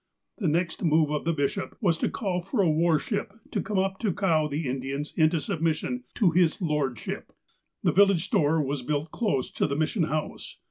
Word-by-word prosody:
' - - -57
' - - -55
The 195 - 0
next 170 +3 0
move 155 -2 +3
of 150 0 -2
the 165 - +2
bishop 155 +5 -2
was 180 -8 +2
to - - +1
call 185 -4 -2
for 195 +4 0
a - - +3
war 160 +1 +3
ship 200 +5 -3 0.2
to - - 0
come 210 -2 -3
up 190 0 0
to 215 -4 0
cow 165 -5 +2
the 150 0 -3
Indians 135 +3 -3
into 160 0 +3
submission 165 - -2
to 195 -7 +3
''His 175 +2 +3
Lordship." 150 - -2 0.5
The - - +3
village 195 -3 +4
store 160 -4 +2
was 140 0 -2
built 150 +4 -2
close 140 - -1
to - - 0
the 140 - -2
Mission 160 +4 +1
House. 155 0 -4
160 Hz, 205 wpm, -27 LUFS, 150-190 Hz, 0.5 s, village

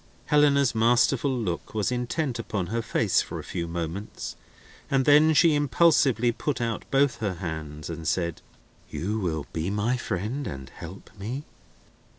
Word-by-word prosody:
Helena's 140 -3 +4
masterful 120 +4 +3
look 110 -8 -3
was 105 +2 0
intent 125 +1 -1
upon 105 -5 -3
her 115 - +1
face 110 -3 +2
for - - -6
a - - -6
few 85 -1 -4
moments, 85 +4 -5 0.5
and 135 -1 +2
then 150 +2 +6
she 165 0 +6
impulsively 145 -5 +3
put 135 +3 -2
out 115 -2 -3
both 140 -1 +3
her 100 -4 -2
hands 80 -4 -6
and 80 -1 -5
said: 85 -2 -1 0.5
"You 105 +5 -2
will 80 -6 -2
be 80 +3 -1
my 105 +5 0
friend 115 +6 -3
and 65 -1 -7
help 90 +4 -10
me?" 120 +8 -4
115 Hz, 155 wpm, -26 LUFS, 85-135 Hz, 0.5 s, then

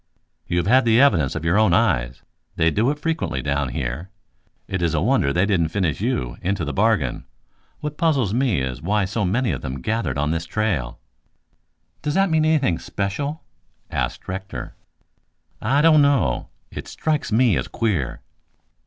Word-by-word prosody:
"You 85 - -1
have 85 - +1
had 130 +6 +5
the 115 0 +4
evidence 90 - +3
of 80 0 -4
your 85 +6 +3
own 110 -5 +4
eyes. - - +1 0.3
They 80 0 +2
do 110 +8 +2
it 145 - -1
frequently 150 - -2
down 70 -1 0
here. 65 +8 -4 0.6
It 95 -2 -3
is 85 -2 +1
a - - +2
wonder 105 - +2
they 90 +6 +2
didn't 95 -6 +2
finish 85 -5 -1
you - - -1
into 95 -2 -1
the 75 - -3
bargain. 100 - +1 0.6
What 150 0 -5
puzzles 135 - +2
me 120 - +1
is 65 0 -4
why 100 +3 +1
so 105 +2 -1
many 115 +7 +1
of - - -4
them 65 -1 -5
gathered 110 - -2
on 75 +1 0
this 85 +1 -2
trail." 90 - -1 1.0
"Does 150 +1 -2
that 195 -2 +3
mean 155 -1 +3
anything 140 - +2
special?" 140 +11 -3 0.5
asked - - -3
Rector. 95 -9 -6 0.9
"I 140 +6 +2
don't 155 -2 +6
know. 140 -1 +2 0.2
It - - -7
strikes 155 -6 -2
me 115 0 +4
as - - -2
queer." 95 - -2
100 Hz, 170 wpm, -22 LUFS, 80-130 Hz, 1.0 s, don't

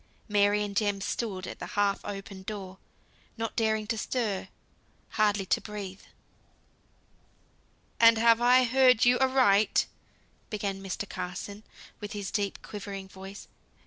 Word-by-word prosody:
Mary 205 0 +3
and 205 -1 -5
Jem 205 -1 +1
stood 195 -2 -3
at - - -8
the - - -6
half 200 -1 +2
open 195 -1 -7
door, 190 -2 -7 0.6
not 225 -1 -3
daring 220 -2 +1
to 225 0 -2
stir; 210 -8 -2 0.6
hardly 210 -2 +1
to - - +1
breathe. 200 -3 -7 2.0
"And 230 -1 +7
have 230 +1 +5
I 250 +1 +6
heard 250 -1 +5
you 245 +1 +5
aright?" 255 -6 +4 0.6
began 200 -3 -3
Mr. 195 +1 -4
Carson, 200 +4 -6 0.4
with 210 -1 -6
his 205 -2 -4
deep 200 -2 -2
quivering 195 -2 -7
voice. 195 +1 -10
205 Hz, 130 wpm, -29 LUFS, 195-225 Hz, 2.0 s, And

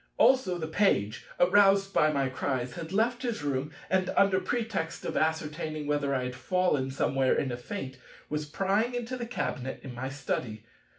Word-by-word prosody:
Also 235 -9 +4
the 160 -2 -4
Page, 110 - +1
aroused 195 +1 +5
by 155 0 +4
my 140 -2 +1
cries, 130 -1 -2
had 165 -1 -7
left 235 +5 +1
his 235 - -2
room, 140 0 -1 0.2
and 185 -1 +1
under 195 -1 +5
pretext 190 -5 -2
of - - -3
ascertaining 155 -1 -1
whether 145 -1 0
I 130 - 0
had 125 0 -3
fallen 140 0 +1
somewhere 135 0 +1
in 135 - 0
a 120 - -3
faint, 130 -1 -6 0.3
was 150 0 -3
prying 200 +9 0
into 245 +1 -3
the 240 -2 -5
cabinet 135 - -3
in 130 - -7
my 130 +2 -4
study. 125 -5 -3
155 Hz, 175 wpm, -29 LUFS, 135-195 Hz, 0.3 s, aroused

